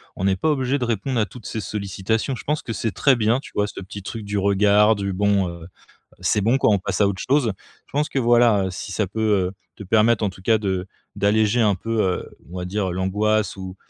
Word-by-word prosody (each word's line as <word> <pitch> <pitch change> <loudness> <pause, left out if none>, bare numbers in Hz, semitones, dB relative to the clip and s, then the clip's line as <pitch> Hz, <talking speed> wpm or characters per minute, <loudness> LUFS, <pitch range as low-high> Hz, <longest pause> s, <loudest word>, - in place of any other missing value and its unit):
on - - -5
n'est 95 -1 +2
pas 155 - +1
obligé 135 -1 0
de 125 - -1
répondre 115 +2 -1
à 110 - +2
toutes 120 +3 -13
ces 110 - -4
sollicitations. 105 +5 -2
Je - - -10
pense 150 +1 0
que - - -6
c'est 115 0 -2
très 135 -3 +3
bien, 115 +2 +2
tu - - -12
vois, 105 0 +1
ce 105 - -8
petit 100 +2 -8
truc 110 +3 -6
du 100 0 -3
regard 100 +2 +4
du 100 -1 -3
bon, 100 -1 +1
heu, 85 -1 -9 0.5
c'est 105 - +1
bon, 120 +6 +3
quoi, - - +3
on 100 - +3
passe 95 - -3
à 100 - +5
autre 95 -1 -3
chose. 130 -5 +2 0.3
Je - - -26
pense 150 +2 0
que - - -1
voilà, 120 -4 +4
heu, - - -3
si 90 +2 -6
ça 105 +1 0
peut, 105 +4 -5 0.3
heu, - - -8 0.2
te 105 - -9
permettre, 110 +3 +3
en - - +2
tout 95 0 -15
cas, 110 +3 +3
de 95 -3 -2 0.3
d'alléger 110 +3 +2
un 105 -2 +3
peu, 115 +3 -1
heu, 90 -1 -1 0.2
on 90 - -5
va 90 - -4
dire 95 0 -1
l'angoisse 105 +4 0
ou 95 -1 -7
105 Hz, 250 wpm, -22 LUFS, 95-115 Hz, 0.5 s, à